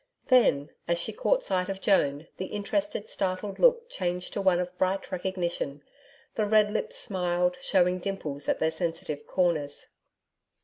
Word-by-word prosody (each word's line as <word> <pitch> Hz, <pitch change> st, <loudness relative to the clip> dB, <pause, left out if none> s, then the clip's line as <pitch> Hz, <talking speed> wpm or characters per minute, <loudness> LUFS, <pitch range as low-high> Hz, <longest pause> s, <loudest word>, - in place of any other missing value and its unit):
Then, 155 Hz, -, +4 dB, 0.2 s
as 170 Hz, 0 st, +2 dB
she -, -, -2 dB
caught -, -, +1 dB
sight 185 Hz, 0 st, 0 dB
of 195 Hz, 0 st, -3 dB
Joan, 150 Hz, -7 st, +2 dB
the 185 Hz, -, -4 dB
interested, 255 Hz, +4 st, -2 dB
startled 195 Hz, +1 st, -3 dB
look 475 Hz, -1 st, +4 dB
changed 180 Hz, -, -3 dB
to 200 Hz, -, -1 dB
one 185 Hz, -2 st, +3 dB
of 180 Hz, 0 st, -3 dB
bright 190 Hz, +1 st, 0 dB
recognition, 175 Hz, -6 st, -3 dB, 0.5 s
the 215 Hz, -2 st, 0 dB
red 210 Hz, 0 st, +4 dB
lips 455 Hz, -, -2 dB
smiled, 180 Hz, -, 0 dB
showing 180 Hz, -1 st, +2 dB
dimples 160 Hz, -7 st, -3 dB
at -, -, +2 dB
their 160 Hz, -, +1 dB
sensitive 160 Hz, -3 st, -3 dB
corners. 160 Hz, -6 st, 0 dB
185 Hz, 150 wpm, -28 LUFS, 170-205 Hz, 0.5 s, Then